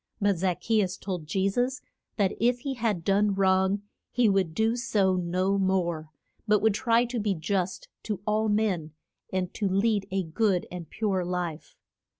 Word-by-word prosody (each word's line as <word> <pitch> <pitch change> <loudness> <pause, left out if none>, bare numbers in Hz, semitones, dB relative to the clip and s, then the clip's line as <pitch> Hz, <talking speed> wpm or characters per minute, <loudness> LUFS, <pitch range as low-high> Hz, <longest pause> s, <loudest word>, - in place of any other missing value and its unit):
But 200 -4 +2
Zac 180 -1 0
che 220 -1 +2
us 190 0 -2
told 180 -5 -5
Je 190 +5 +1
sus 245 +6 0 0.4
that 200 -3 +2
if 245 +2 +2
he 275 +1 -2
had 220 -8 -1
done 200 +1 +2
wrong 190 +1 +2 0.3
he 245 -2 +2
would 190 -5 +1
do 220 +3 +2
so 200 -6 +1
no 185 +2 0
more, 175 -5 0 0.4
but 210 0 +4
would 220 -2 +4
try 235 +2 +2
to 240 0 -3
be 205 -2 0
just 185 +3 -2
to 210 -4 -3
all 215 +1 +1
men 195 -8 0 0.4
and 185 -1 -2
to 200 -3 -1
lead 200 +1 +1
a 190 0 0
good 180 +2 +1
and 175 -2 -7
pure 200 -4 -1
life. 175 -3 -4
195 Hz, 175 wpm, -27 LUFS, 180-215 Hz, 0.4 s, but